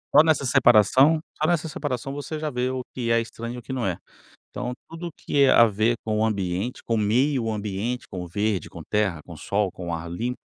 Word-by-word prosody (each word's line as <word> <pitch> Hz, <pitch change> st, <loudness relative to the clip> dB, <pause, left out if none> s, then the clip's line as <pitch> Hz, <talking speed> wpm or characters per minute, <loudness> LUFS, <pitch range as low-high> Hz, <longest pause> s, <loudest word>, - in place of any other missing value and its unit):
Só 150 Hz, -, +10 dB
nessa 160 Hz, -3 st, +2 dB
separação 130 Hz, +4 st, +5 dB, 0.2 s
só 155 Hz, -, +3 dB
nessa 170 Hz, -2 st, +1 dB
separação 135 Hz, -3 st, -4 dB
você 145 Hz, +2 st, -5 dB
já 155 Hz, -1 st, -3 dB
vê 125 Hz, 0 st, -1 dB
o 130 Hz, -1 st, -3 dB
que 120 Hz, -2 st, -3 dB
é 115 Hz, -, +4 dB
estranho 115 Hz, +1 st, -6 dB
e -, -, -7 dB
o -, -, -7 dB
que 130 Hz, -, -6 dB
não 130 Hz, -2 st, -2 dB
é. 90 Hz, -3 st, -1 dB, 0.5 s
Então, 125 Hz, 0 st, -4 dB, 0.2 s
tudo 165 Hz, 0 st, -7 dB
que 140 Hz, -1 st, +2 dB
é 135 Hz, -, +5 dB
a 115 Hz, -, +7 dB
ver 110 Hz, +2 st, +1 dB
com 110 Hz, -1 st, -1 dB
o 110 Hz, -, +2 dB
ambiente, 100 Hz, +2 st, -2 dB
com 115 Hz, -, -1 dB
meio 120 Hz, +4 st, +2 dB
ambiente, 105 Hz, +3 st, -3 dB
com 90 Hz, -, -5 dB
o -, -, -6 dB
verde, 100 Hz, +1 st, -1 dB
com -, -, -10 dB
terra, 105 Hz, -6 st, 0 dB
com -, -, -10 dB
sol, 100 Hz, -1 st, -1 dB
com 90 Hz, -1 st, -8 dB
o 85 Hz, -, -1 dB
ar 85 Hz, +1 st, -6 dB
limpo 120 Hz, +8 st, -3 dB
115 Hz, 235 wpm, -24 LUFS, 105-135 Hz, 0.5 s, Só